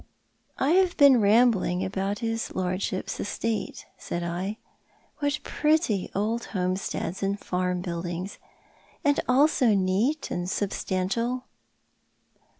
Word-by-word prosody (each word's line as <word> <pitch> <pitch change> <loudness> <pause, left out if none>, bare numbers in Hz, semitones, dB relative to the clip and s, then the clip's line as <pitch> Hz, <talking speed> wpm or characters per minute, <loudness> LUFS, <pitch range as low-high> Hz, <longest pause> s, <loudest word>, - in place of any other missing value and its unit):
" - - -44
I 275 - +2
have 365 0 +3
been 275 -5 +7
rambling 205 -4 +3
about 195 +1 -2
his 225 0 -3
lordship's 185 +1 -2
estate," 220 +2 -3
said 175 - -4
I. 180 +5 -3 0.3
" - - -36
What 290 0 0
pretty 300 - +1
old 220 +4 -1
homesteads 185 -1 -2
and 200 +1 -1
farm 180 -1 -1
buildings! 175 +2 -4 0.7
And 285 0 +3
all 270 +4 +6
so 245 -8 +2
neat 200 +11 0
and 175 0 -2
substantial." 205 +5 -1
200 Hz, 120 wpm, -26 LUFS, 185-245 Hz, 0.7 s, been